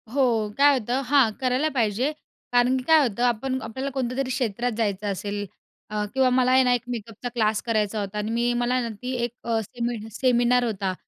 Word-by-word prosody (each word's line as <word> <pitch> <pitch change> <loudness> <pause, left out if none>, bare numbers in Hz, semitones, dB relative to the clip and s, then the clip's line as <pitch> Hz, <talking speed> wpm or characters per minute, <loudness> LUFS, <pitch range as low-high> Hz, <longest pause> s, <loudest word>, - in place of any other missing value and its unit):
हो 235 -5 +1
काय 285 0 +5
होतं 245 +3 -1
हां 265 -3 +4
करायला 260 +4 +1
पाहिजे. 245 0 0 0.4
कारण 245 +1 +3
की 255 - -4
काय 320 +3 +6
होतं 235 +2 -3
आपण 245 +2 0
आपल्याला 260 +5 -4
कोणत्यातरी 260 0 -2
क्षेत्रात 245 -1 -1
जायचं 205 -2 -1
असेल 205 +1 -4 0.4
अ, 210 0 -2
किंवा 265 -1 +3
मला 255 0 +3
आहे 260 0 +6
ना, 250 -1 +3
एक 245 - 0
मेकअपचा 230 0 -5
क्लास 220 -3 0
करायचा 215 -2 -1
होता 200 0 -4
आणि 210 +1 -2
मी 240 +1 +1
मला 245 +1 +1
ना 235 - -3
ती 250 0 -4
एक 240 - -1
अ, 230 -1 0
सेमि 235 +2 -4
सेमिनार 245 +1 +2
होता, 195 -5 -2
240 Hz, 195 wpm, -24 LUFS, 220-255 Hz, 0.4 s, काय